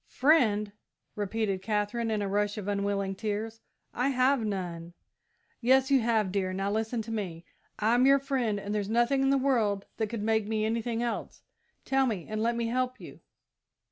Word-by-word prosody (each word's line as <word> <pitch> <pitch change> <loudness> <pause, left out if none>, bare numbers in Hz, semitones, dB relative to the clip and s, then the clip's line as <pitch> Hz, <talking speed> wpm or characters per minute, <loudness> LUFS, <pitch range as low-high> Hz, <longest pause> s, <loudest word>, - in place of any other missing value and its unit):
"Friend?" 225 -8 +3 0.4
repeated 205 -1 -1
Katherine, 210 +3 -1
in 215 -2 0
a - - -1
rush 205 +2 0
of 205 -2 -5
unwilling 200 -1 -1
tears; 220 +3 -4 0.3
"I 250 - 0
have 260 -1 +2
none!" 175 -5 -4 0.7
"Yes 260 +3 +4
you 270 - +6
have, 220 -4 +1
dear; 190 -1 -1
now 195 +1 -1
listen 220 +2 -1
to 225 - -7
me. 180 -6 -4 0.3
I'm 240 +4 +3
your 275 0 +7
friend, 260 -7 -1
and 200 +1 -4
there's 205 -1 -2
nothing 240 +4 +2
in 270 - +3
the 275 - +4
world 225 -7 +1
that 220 - 0
could 225 -2 -4
make 220 -1 +1
me 215 0 0
anything 230 +1 -1
else. 235 - -4 0.4
Tell 270 0 +2
me, 205 -8 -3
and 215 0 -3
let 235 +1 +1
me 235 0 -1
help 255 +2 -1
you!" - - -11
220 Hz, 180 wpm, -29 LUFS, 205-240 Hz, 0.7 s, your